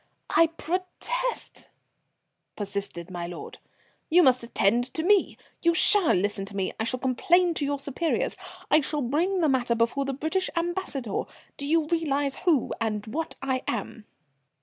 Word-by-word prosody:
"I 330 - +6
protest," 365 +9 -3 0.9
persisted 200 -4 -5
my 175 -1 -4
lord. 175 -1 -8 0.5
"You 350 +2 +6
must 255 -3 +5
attend 235 0 +2
to 320 - -1
me 400 +2 +3 0.2
you 335 0 +3
shall 395 -1 +4
listen 200 +1 0
to 200 0 -10
me. 190 -1 -1
I 220 - 0
shall 255 +2 -1
complain 335 +8 +3
to 295 - -1
your 285 0 0
superiors 280 +4 -1 0.4
I 310 - +6
shall 295 0 -2
bring 345 +9 +1
the 320 - +4
matter 245 -3 +2
before 235 +4 +1
the 275 - -2
British 320 +7 -1
ambassador. 335 - -2 0.3
Do 280 - -5
you 320 +1 +3
realize 290 -4 0
who 320 -9 +2
and 215 -2 -1
what 315 +9 -4
I 260 -1 0
am?" 220 0 -4
280 Hz, 155 wpm, -27 LUFS, 230-335 Hz, 0.9 s, I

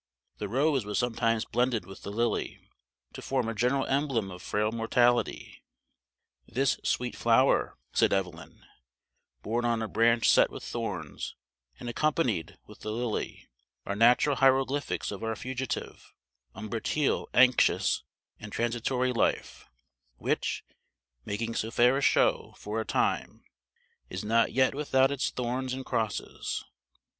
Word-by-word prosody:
The 105 - -4
rose 135 +2 +2
was 105 0 -3
sometimes 115 -2 +1
blended 120 -5 0
with 95 +1 -11
the - - -7
lily, 115 +1 -1 0.5
to - - -8
form 130 -4 -1
a 115 - -2
general 125 +4 +1
emblem 135 -8 0
of 90 0 -9
frail 105 +1 0
mortality. 120 +1 +1 0.8
"This 135 +1 0
sweet 125 -1 -1
flower," 120 +3 +3 0.2
said - - +3
Evelyn, 90 -6 -3 0.8
"borne 115 +3 -1
on 115 -1 +1
a - - -2
branch 115 +1 +3
set - - +6
with - - -9
thorns 95 -10 -5 0.4
and - - -7
accompanied 120 - 0
with 105 - -15
the 110 - -5
lily, 115 0 -3 0.4
are 100 - -2
natural 120 +6 +4
hieroglyphics 135 +1 +2
of 100 +2 -7
our 115 0 -1
fugitive, 130 +4 -5 0.4
umbratile, 115 +7 -1
anxious, 130 0 +4 0.4
and 105 -1 -9
transitory 120 +3 0
life, 115 - -1 0.5
which, - - -1 0.6
making 115 +3 -3
so 110 - -2
fair 120 +2 +4
a 140 - 0
show - - +2
for 110 +2 -3
a - - -5
time, - - -1 0.7
is 95 +2 -5
not 115 +1 +3
yet 130 +2 +3
without 135 -2 +2
its 140 -1 0
thorns 125 +1 -3
and 130 0 -7
crosses." 110 -2 -3
120 Hz, 135 wpm, -29 LUFS, 110-130 Hz, 0.8 s, set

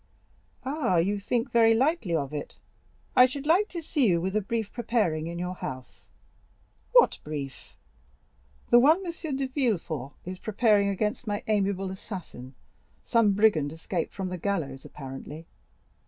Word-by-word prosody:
"Ah, 265 - 0
you 200 +5 +1
think 230 +4 -1
very 225 -1 +5
lightly 260 - +1
of 140 -2 -2
it; 145 - -5 0.6
I 250 - +8
should 275 +2 -6
like 365 +7 +3
to 340 -2 -6
see 290 -5 +1
you 175 -3 +3
with 190 +4 -2
a 215 - +3
brief 220 +1 -3
preparing 210 -10 0
in 170 0 -5
your 180 +1 -3
house." 130 -8 -8 0.8
"What - - +5
brief?" 140 -3 -7 1.0
"The 240 - +8
one 315 +9 +4
M. 330 -4 -4
de 270 - -1
Villefort 185 - -2
is 185 +1 -6
preparing 210 -1 +2
against 210 +5 -2
my 205 -1 -2
amiable 195 -3 0
assassin—some 190 - -3
brigand 195 -9 +3
escaped 165 +2 -3
from 190 -2 -3
the 180 -1 -5
gallows 160 -9 -3
apparently." 145 +3 -8
200 Hz, 145 wpm, -27 LUFS, 165-240 Hz, 1.0 s, I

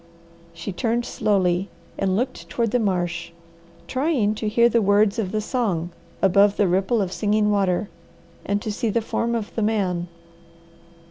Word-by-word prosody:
She 170 +3 -6
turned 235 +3 -1
slowly 190 -4 +1 0.3
and 190 -1 0
looked 255 +5 -3
toward 230 -3 -1
the 245 - +2
marsh, 175 -4 -1 0.5
trying 260 -6 +1
to 215 0 -3
hear 235 +2 +4
the 235 -1 +2
words 205 +1 +3
of 190 -4 -2
the 215 0 -1
song 200 -8 -1 0.3
above 200 +1 +4
the 205 - +3
ripple 195 +5 +1
of 180 - -4
Singing 210 +3 +1
Water, 200 0 +1 0.6
and 205 +1 -1
to 215 - -2
see 220 +2 -1
the 230 +2 +1
form 235 +1 -1
of 220 -3 -4
the 225 - -2
man. 190 -5 0
205 Hz, 160 wpm, -23 LUFS, 185-225 Hz, 0.6 s, hear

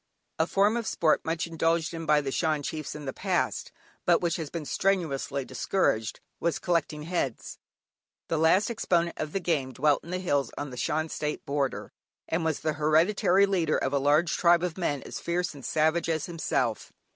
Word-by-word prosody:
A 160 - +3
form 205 +5 +3
of 230 -2 -3
sport 160 -7 +2
much 165 +1 -1
indulged 165 0 0
in 165 -1 -5
by 150 -1 +4
the 135 -2 -3
Shan 155 -1 0
chiefs 155 +1 -4
in 150 -1 -7
the 135 - -3
past, - - -1 0.3
but 175 -1 +4
which 170 -2 0
has 160 -4 -5
been 165 -3 -5
strenuously 145 -8 0
discouraged 125 - 0 0.2
was 170 -1 0
"Collecting 155 -3 -1
Heads." 155 -8 -3 0.7
The 165 - 0
last 185 +8 +4
exponent 175 -6 0
of 155 -1 -3
the 195 - -1
game 150 -7 -1
dwelt 145 +3 +2
in 170 - -12
the 180 - -1
hills 145 -9 0
on 145 -2 -4
the - - -7
Shan 155 +5 -1
State 150 0 -3
border, 140 -1 -2 0.4
and 165 +1 -1
was 160 -2 -1
the 155 -1 0
hereditary 170 +6 +3
leader 175 -6 +1
of 135 - -1
a 140 - +3
large 150 +4 +3
tribe 170 -1 +4
of 175 -3 -2
men 145 -7 -2
as - - -6
fierce 175 +1 -1
and 140 -3 -12
savage 160 +2 +1
as 160 -2 0
himself. 130 -9 -2
160 Hz, 190 wpm, -28 LUFS, 145-175 Hz, 0.7 s, by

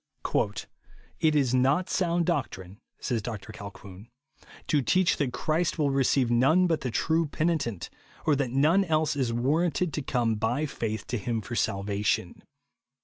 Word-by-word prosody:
"It 155 -1 +3
is 135 -4 +2
not 135 +8 +2
sound 175 -2 0
doctrine," 105 - -3 0.2
says 120 -4 -1
Dr 110 -1 -7
Colquhoun, 100 0 -10 0.3
" - - -21
to 150 - +3
teach 185 +6 +2
that 140 -4 0
Christ 160 +7 -1
will 145 -3 +1
receive 135 -2 +2
none 135 +10 +4
but 165 -3 0
the 130 - -2
true 160 +7 +1
penitent, 150 - -2 0.3
or 150 - +4
that 135 -2 -1
none 155 +10 +3
else 155 -3 +1
is 130 -4 0
warranted 155 +7 0
to 150 - -2
come 120 -4 0
by 120 +8 0
faith 110 -6 -4
to 120 - -3
him 115 +3 -2
for 110 +3 -6
salvation. 100 -1 -1
135 Hz, 155 wpm, -27 LUFS, 115-155 Hz, 0.3 s, none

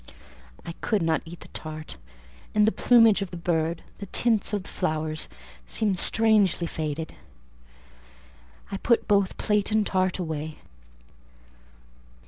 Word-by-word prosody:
I - - -5
could 210 -6 0
not 160 -1 +1
eat 170 +1 -11
the - - -10
tart; 155 0 -7 0.6
and 210 0 +5
the - - +4
plumage 230 -4 +5
of 195 - -3
the 175 - -7
bird, 165 -1 -1 0.2
the 200 - -7
tints 225 0 +2
of 205 -3 -2
the - - -11
flowers, 155 -3 -2 0.4
seemed 205 -5 +1
strangely 210 -6 +3
faded: 160 -1 -4 1.6
I 195 - -2
put 235 +3 +1
both 200 -2 +2
plate 210 -1 +1
and 215 -1 +2
tart 185 -1 0
away. 155 -3 -4
185 Hz, 130 wpm, -26 LUFS, 160-210 Hz, 1.6 s, and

